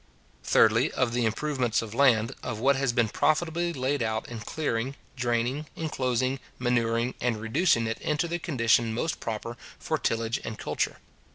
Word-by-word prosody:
Thirdly, - - +4
of 125 -2 0
the 120 -1 +1
improvements 125 0 0
of 110 -1 -8
land, 120 -3 +4
of 115 -3 -4
what 135 +5 +3
has 135 -1 +1
been 120 -2 +2
profitably 170 +8 +1
laid 135 -1 -1
out 110 -1 -1
in 120 -2 -6
clearing, 130 0 -2 0.2
draining, 125 +4 -1
inclosing, 130 -4 -1 0.2
manuring, 120 -1 +1
and 120 -3 0
reducing 115 +2 +2
it 115 0 -3
into 155 +3 0
the 170 +1 -2
condition 115 -7 +2
most 160 +6 -2
proper 115 +1 -4 0.2
for - - -2
tillage 115 0 0
and 110 -1 -5
culture. - - -2
120 Hz, 160 wpm, -27 LUFS, 115-140 Hz, 0.2 s, Thirdly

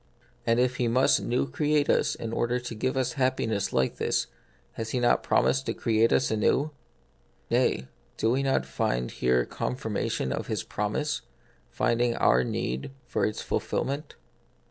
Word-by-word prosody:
And 115 +1 +3
if 125 0 +2
He 120 - +1
must 125 +3 +3
new 125 +3 0
create 150 0 +1
us - - +2
in 115 0 -5
order 120 +2 0
to 120 -1 -6
give 130 +4 -1
us 130 +3 0
happiness 120 -7 0
like 65 - +1
this, - - 0 0.5
has 115 -1 -5
He 125 - -1
not 120 0 +3
promised 135 0 +2
to - - -1
create 115 0 +2
us 130 - +2
anew? 125 +7 +2 0.8
Nay, 65 - +2 0.3
do 110 - +2
we 130 +2 +2
not 135 - +1
find 60 -2 -1
here 60 -1 +2
confirmation 110 - -2
of - - -4
His - - -2
promise, - - -2 0.5
finding 120 0 +1
our 60 +1 +4
need 65 +1 -3 0.2
for - - 0
its 105 - -4
fulfil - - -1
ment 140 +3 -5
120 Hz, 165 wpm, -27 LUFS, 105-130 Hz, 0.8 s, our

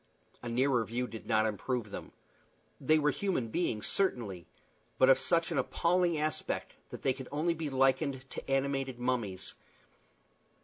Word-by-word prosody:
A 120 - -5
nearer 125 0 +2
view 120 +4 -2
did 115 -3 -9
not 110 -2 +3
improve 110 +1 -2
them. - - -7 0.7
They 155 +4 +4
were 150 -1 +3
human 155 - -1
beings, 110 -7 -1
certainly, 110 - -1 0.5
but 130 - +6
of 135 - +7
such 170 0 +2
an 150 - +1
appalling 170 +5 +2
aspect 155 0 -2 0.2
that - - -9
they 130 - +3
could 130 -1 -8
only 155 +4 +1
be 160 -2 -4
likened 135 0 +1
to - - -7
animated 135 -1 0
mummies. 120 -7 -2
130 Hz, 150 wpm, -32 LUFS, 120-155 Hz, 0.7 s, of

